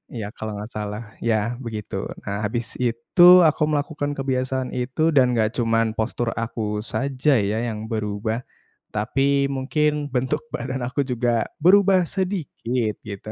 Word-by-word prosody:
iya 105 -3 -4
kalo 110 -1 -5
nggak 105 +3 -7
salah, 105 0 -4 0.2
yah 110 -3 +1 0.2
begitu. 110 -3 -5 0.3
Nah 100 +1 -3
habis 115 +3 -2
itu 120 +8 0 0.3
aku 155 - 0
melakukan 145 0 -1
kebiasaan 130 -1 -1
itu 125 +4 -3
dan 125 -3 +5
nggak 110 -2 +1
cuman 115 -1 +2
postur 115 +1 -1
aku 115 0 -3 0.3
saja 135 +2 +1 0.2
ya 110 - -1
yang 110 -2 -4
berubah, 110 +2 -2 0.5
tapi 110 +6 0 0.3
mungkin 150 +2 0
bentuk 130 +4 0
badan 130 +1 -3
aku 130 +3 -2
juga 120 -1 +1 0.2
berubah 190 0 +6
sedikit, 145 - -2
gitu. 100 0 -8
120 Hz, 140 wpm, -23 LUFS, 110-135 Hz, 0.5 s, berubah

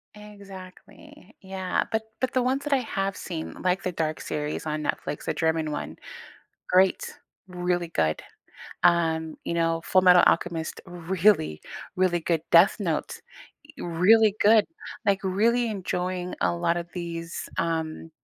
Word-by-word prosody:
Exactly. 200 -1 -13
Yeah. 190 -1 -2
But 220 -1 0 0.2
but 260 - -1
the 255 - +2
ones 265 +3 0
that 295 -1 0
I - - +5
have 195 -5 -2
seen, 165 -3 -6
like 185 +1 0
the 185 - -1
Dark 160 -2 -2
series 150 0 -4
on 155 0 -2
Netflix, 145 - -3
the - - -1
German 160 -1 0
one, 80 - -5 0.7
great, 185 +1 +2 0.3
really 180 -1 -1
good. 80 - 0 0.6
Um, 160 -2 +2
you - - -2
know, 165 -1 0
Fullmetal 180 -1 +6
Alchemist, 165 -1 0
really, 175 - +1 0.4
really 180 -2 +2
good. 165 -1 0
Death 170 +3 +7
Note, 170 -7 -3 0.6
eh, - - -6
really 205 +5 +4
good. 215 0 +6 0.4
Like, 200 -1 +3
really 230 +6 +2
enjoying 180 -3 -3
a - - +1
lot 170 0 0
of 170 0 -3
these, 170 -1 -5
um, 160 -1 -2
180 Hz, 140 wpm, -26 LUFS, 165-195 Hz, 0.7 s, Death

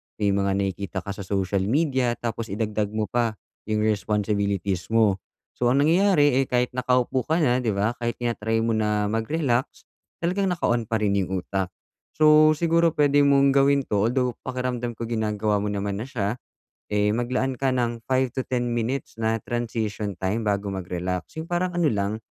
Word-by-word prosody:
may 100 -2 +1
mga 100 0 +1
nakikita 100 -1 -3
ka 100 - -5
sa 100 - -8
social 95 0 -1
media 130 -3 +1
tapos 115 -1 -4
idagdag 105 0 -1
mo 110 -1 -2
pa 115 -3 0 0.3
yung 105 0 0
responsibilities 100 -3 0
mo. 110 -4 +3 0.3
So 120 - -1
ang 135 +3 +3
nangyayari 165 -2 +4
ay 135 - +2
kahit 125 0 +1
nakaupo 125 0 0
ka 160 +1 +2
na 125 -2 +3
'di 115 -5 -1
ba, 105 +4 +1
kahit 120 0 -2
tina-try 115 -2 -1
mo 115 - +1
na 105 -1 0
mag-relax 125 +2 -1 0.4
talagang 190 +3 +1
naka-on 120 - 0
pa 115 - -1
rin 105 -2 +1
yung 95 -1 -2
utak. 95 -2 -2 0.5
So 155 0 +6
siguro 165 0 +2
puwede 145 -1 +4
mong 140 -1 +5
gawin 140 0 +3
'to 105 -2 +1
although 125 0 +1 0.2
pakiramdam 125 -2 -3
ko 115 - -6
ginagawa 110 -2 0
mo 105 - -2
naman 100 0 -2
na 115 - -5
siya, 115 -2 -2 0.5
eh, 105 +1 +2
maglaan 125 +2 -1
ka 135 0 0
ng 120 -2 -1
5 130 0 +1
to 130 - -1
10 125 -1 -1
minutes 120 +2 -2
na 115 0 0
transition 110 -4 -3
time 100 +4 -1
bago 100 -1 0
mag-relax. 90 -1 -4
Yung 160 - -7
parang 180 +1 0
ano 175 -2 +2
lang, 105 -2 -1
115 Hz, 175 wpm, -24 LUFS, 105-130 Hz, 0.5 s, So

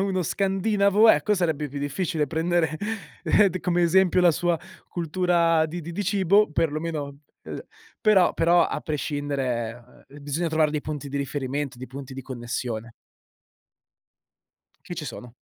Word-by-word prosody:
uno 190 -2 0
scandinavo 200 +3 +2
ecco 210 - +2
sarebbe 160 -5 -1
più 140 +1 -6
difficile 150 +2 -1
prendere 165 +1 0 0.7
d 185 +1 -4
come 175 -1 +1
esempio 180 +1 +4
la 175 - +7
sua 170 +1 0 0.3
cultura 170 -1 +2
di 170 +2 -6
di 170 - -7
di 205 - -2
cibo, 200 0 +3
per 155 0 +1
lo 155 - -2
meno, 150 -4 -4 0.3
ehm - - -6 0.4
però 200 -5 +4
però 170 +1 +4
a - - -3
prescindere, 130 -6 -3
ehm, 145 +1 -13
bisogna 155 +4 -1
trovare 155 -1 +2
dei 150 - -2
punti 145 -2 -6
di 140 - -2
riferimento, 140 0 -3
dei 130 +1 -8
punti 135 +1 -9
di 135 - -7
connessione. 120 -2 -5 1.9
Che 175 - -6
ci 155 - -5
sono. 125 -2 -9
160 Hz, 150 wpm, -25 LUFS, 140-175 Hz, 1.9 s, la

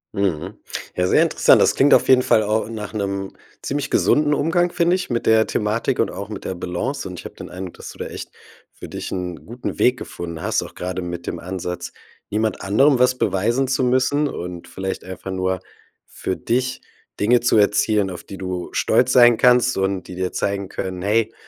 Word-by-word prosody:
Mhm. 95 -7 -1 0.4
Ja, 90 0 +1
sehr - - +5
interessant. - - +4
Das - - +4
klingt 145 +2 +5
auf - - +5
jeden 130 -1 +6
Fall 110 - +3
auch 110 +1 0
nach 110 -1 -6
'nem 100 -2 -3 0.3
ziemlich 145 +1 -2
gesunden 150 0 +3
Umgang, 175 +4 +1
finde 175 +1 +2
ich, 185 - -4
mit 120 -1 -1
der 110 0 +5
Thematik 110 +5 -1
und - - +2
auch 100 +1 -7
mit 105 - -7
der 95 - -3
Balance. 95 +11 -3
Und 90 -2 -7
ich - - -11
habe - - -9
den - - -9
Eindruck, 90 -1 -7
dass - - -9
du - - -11
da - - -5
echt - - -8 0.4
für - - -10
dich - - -6
'n 90 -4 -5
guten 120 +2 -6
Weg 125 +1 +3
gefunden 85 -1 -7
hast, 110 -2 0
auch 85 - -10
grade 90 +1 -4
mit 85 -1 -6
dem - - -3
Ansatz, 90 -1 -5 0.4
niemand 110 +1 -1
anderem 130 +8 +4
was 125 0 +3
beweisen 120 +8 +1
zu 130 0 0
müssen 130 +4 +2
und 90 -1 -7
vielleicht 95 0 -4
einfach 95 +1 -7
nur 95 0 -1 0.5
für 95 - -4
dich 125 +2 -1 0.4
Dinge 120 +4 +4
zu 120 -2 +3
erzielen, 105 -1 +3
auf 90 -2 -8
die 95 - -9
du 90 -2 -4
stolz 125 0 +2
sein 120 -2 +7
kannst 125 0 +4
und 95 -1 0
die 90 - -8
dir 90 0 -2
zeigen 100 -1 -2
können: 95 -1 -5
„Hey, 110 +3 +1
105 Hz, 205 wpm, -21 LUFS, 95-125 Hz, 0.5 s, sein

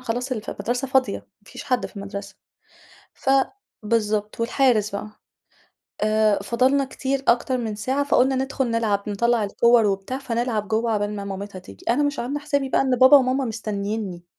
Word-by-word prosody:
خلاص 250 +2 -3
الف 215 -3 -4
المَدرسة 245 +6 -3
فاضية، 260 -1 +2
ما - - -25
فيش - - -9
حد 250 -2 0
في - - -18
المَدرسة. 200 0 -7 0.8
ف 265 - -2 0.5
بالضبط، 215 -1 -1
والحارس 230 -3 +2
بقي. 200 +1 -5 0.9
آآ 215 -1 +3
فضلنا 260 +5 +2
كتير 270 +1 -3
أكتر 245 +2 +2
من 225 -3 -3
ساعة، 260 +7 -1
فقُلنا 265 -1 +3
ندخل 265 -1 -1
نلعب، 215 -3 0
نطلّع 235 +2 +1
الكوّر 235 +3 +4
وبتاع 195 +5 -1
فنلعب 235 -4 -2
جوّه 225 +2 0
عُقبال 210 -1 -1
ما 200 - -5
مامِتها 195 0 -6
تيجي. 95 - -14
أنا 255 +5 +3
مش 290 +1 -1
عاملة 275 +5 -3
حسابي 285 -2 -1
بقى - - +2
إن 260 -2 +2
بابا 260 +3 +9
وماما 260 0 +1
مستنّيني. 210 -4 -4
230 Hz, 165 wpm, -23 LUFS, 210-260 Hz, 0.9 s, بابا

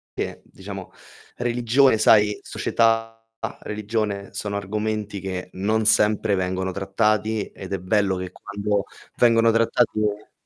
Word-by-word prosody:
che - - -4
diciamo - - -9 0.5
religione, 120 +1 +3
sai, 105 -1 +5
società, 115 0 0 0.4
religione 105 -2 -3
sono 100 -1 -3
argomenti 105 0 -3
che 95 -1 -5
non 110 +4 0
sempre 105 0 +3
vengono 95 0 -1
trattati, 105 +3 0
ed 95 - -10
è - - 0
bello 95 +1 +1
che 90 0 -5
quando 100 0 -2 0.3
vengono 115 -1 +5
trattati 115 -1 +2
e 105 0 -2
105 Hz, 120 wpm, -23 LUFS, 100-110 Hz, 0.5 s, sai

